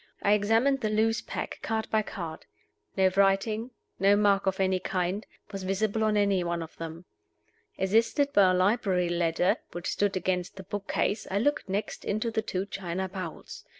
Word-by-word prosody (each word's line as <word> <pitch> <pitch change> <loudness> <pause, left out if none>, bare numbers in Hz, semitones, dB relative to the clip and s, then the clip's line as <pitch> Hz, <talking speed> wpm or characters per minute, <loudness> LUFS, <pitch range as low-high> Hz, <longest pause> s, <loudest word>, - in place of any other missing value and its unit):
I 200 - +4
examined 225 +7 +3
the 215 - 0
loose 220 +1 +2
pack, - - -5
card 220 0 -2
by 220 - +3
card. 170 -6 -7 0.5
No 190 -1 +5
writing, 200 +4 +2 0.3
no 200 +1 +5
mark 200 -1 +3
of 190 0 0
any 190 -1 +2
kind, 185 +2 -2 0.2
was 195 -2 -5
visible 200 +3 0
on 215 -1 +2
any 200 -3 +2
one 170 -1 -2
of 160 - -12
them. 165 +1 -7 0.7
Assisted 230 +9 +2
by 195 -2 +6
a - - +3
library 185 -2 +2
ladder 170 +1 +1 0.2
which 175 0 -3
stood 200 -2 0
against 180 -1 -1
the 190 - -8
book 205 0 -5
case, 205 - 0
I 195 - 0
looked 290 +1 0
next 200 +3 -3
into 215 +3 -1
the 220 - 0
two 190 -2 -3
china 190 -1 -4
bowls. 180 -3 -7
195 Hz, 180 wpm, -28 LUFS, 185-215 Hz, 0.7 s, by